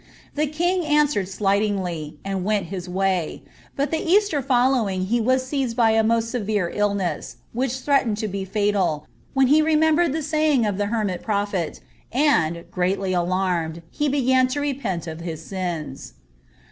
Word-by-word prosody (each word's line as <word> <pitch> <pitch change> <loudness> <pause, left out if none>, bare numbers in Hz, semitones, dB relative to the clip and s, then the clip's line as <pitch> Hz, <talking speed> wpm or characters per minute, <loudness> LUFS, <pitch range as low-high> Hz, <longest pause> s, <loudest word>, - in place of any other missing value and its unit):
The 300 +1 0
king 350 +5 0
answered 295 - +2
slightingly, 195 -6 -1
and 195 -2 -2
went 200 -3 0
his 180 -1 -5
way; 185 -2 -1 0.3
bnt 280 +1 0
the 320 - +1
Eaeier 350 -4 +2
(<A 250 +1 +4
lowing 195 -8 0
he 235 +4 +1
was 255 +3 +2
seized 260 -3 -2
with 225 -2 +4
a 225 - +5
moat 225 +1 +2
severe 215 -6 -1
illness, 200 -6 -1 0.2
which 255 +2 -1
threatened 260 -5 +1
to 215 - -2
bt 200 +1 -1
&tal, 175 -7 0 0.3
when 270 0 +5
he 295 +4 +5
remembered 315 +1 +3
the 315 +2 -2
saying 305 -4 +2
of 205 -2 -1
the 205 - +1
henntt 210 -5 -1
prophet, 200 -6 -2 0.3
nml, 170 - +2
graUy 185 +1 0
alarmed, 175 -2 -1
he 295 0 0
began 260 -2 +3
to 260 +3 -2
repent 250 - -2
of 160 -1 -6
his 165 -2 -6
sins." 175 -7 -5
210 Hz, 160 wpm, -23 LUFS, 185-270 Hz, 0.3 s, a